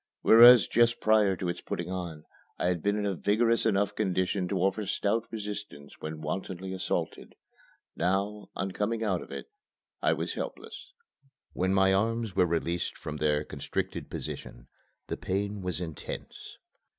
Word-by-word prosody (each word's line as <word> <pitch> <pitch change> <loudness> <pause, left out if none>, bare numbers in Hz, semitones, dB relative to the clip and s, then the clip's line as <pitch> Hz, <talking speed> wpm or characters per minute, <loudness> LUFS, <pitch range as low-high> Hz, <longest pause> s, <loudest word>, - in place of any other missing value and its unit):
Whereas 120 0 +9
just 120 0 +3
prior 105 -3 +4
to 90 - -4
its 85 - -3
putting - - -4
on 85 -5 -5 0.3
I - - -2
had 90 -3 -1
been 100 +3 +1
in 105 - -1
a 100 - 0
vigorous 115 +5 +2
enough 100 0 +1
condition 95 -2 0
to - - -1
offer 95 +3 +1
stout 110 +4 0
resistance 105 -9 -7
when 80 0 -6
wantonly 95 +4 -4
assaulted, 95 - -3 0.6
now, 100 +4 -1
on 95 +1 -2
coming 110 +4 -1
out 95 -5 0
of - - -11
it, 445 - -7 0.5
I - - +3
was - - -3
helpless. - - -7 0.6
When 95 +1 0
my 95 0 +4
arms 110 0 0
were 90 - +4
released 85 +1 -1
from 75 -1 -6
their 75 0 +1
constricted 70 -2 -4
position, - - -7 0.4
the - - -4
pain 100 +2 -2
was 90 -3 -3
intense. 80 -4 -7
95 Hz, 155 wpm, -29 LUFS, 90-105 Hz, 0.6 s, Whereas